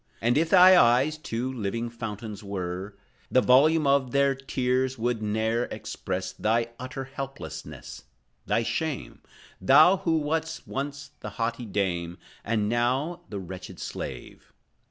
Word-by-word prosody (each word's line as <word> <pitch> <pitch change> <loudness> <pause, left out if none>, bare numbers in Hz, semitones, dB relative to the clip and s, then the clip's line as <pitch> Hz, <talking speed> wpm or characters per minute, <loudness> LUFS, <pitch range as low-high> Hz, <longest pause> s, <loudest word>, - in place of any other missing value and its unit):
Oh, - - -8
if 160 +3 +2
thy 185 0 +8
eyes 130 +6 +3
two 125 -1 -3
living 115 0 -3
fountains 110 -2 -6
were, 95 0 -5 0.3
The 130 - +4
volume 150 +5 +5
of 140 -2 +3
their 140 +1 +3
tears 130 -1 -1
could 120 -1 -1
ne'er 110 +3 0
express 90 0 -5
Thy 115 +2 0
utter 130 +1 -5
helplessness, 135 +1 -8 0.4
thy 115 - +2
shame; 130 +6 -3 0.4
Thou, 155 - +7
who 165 -3 +1
wast 160 +1 -2
once 140 +1 -5
the - - -6
haughty 115 0 -2
dame, 90 -4 -2 0.3
And, 105 -1 0
now, 130 +9 0
the 105 - -5
wretched 95 0 -9
slave. 60 -2 -7
125 Hz, 135 wpm, -27 LUFS, 105-140 Hz, 0.4 s, thy